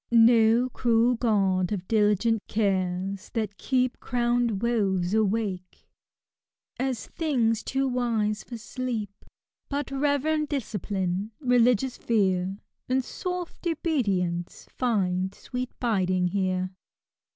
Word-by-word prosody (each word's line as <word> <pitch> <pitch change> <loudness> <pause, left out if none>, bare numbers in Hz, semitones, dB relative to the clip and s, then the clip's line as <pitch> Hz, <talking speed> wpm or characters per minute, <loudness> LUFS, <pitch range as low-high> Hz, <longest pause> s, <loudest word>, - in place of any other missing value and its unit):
No 230 +1 +5 0.2
erad 235 0 +3
guard 195 -5 +2
of 190 -3 -3
diligent 215 0 +2
oara, 190 -2 -1
(hat 210 -3 -1
keep 255 -1 0
Crowned 240 -3 0
woes 195 -6 +1
awake, 205 -4 -1 0.9
as 255 -3 -1
things 240 -9 0
too 270 0 -1
wise 230 -4 0
for 240 - -7
steep: 235 -3 -4 0.6
But 285 -1 -3
reverend 295 +2 +1
discipline, 205 - -2
religious 250 -1 +3
fear, 190 -4 +1 0.3
And 260 0 +1
soft 360 -1 -5
obedience 200 - -1
find 190 -6 0
sweet 250 0 -5
biding 185 -6 +1
here 185 -1 -1
225 Hz, 100 wpm, -26 LUFS, 190-250 Hz, 0.9 s, No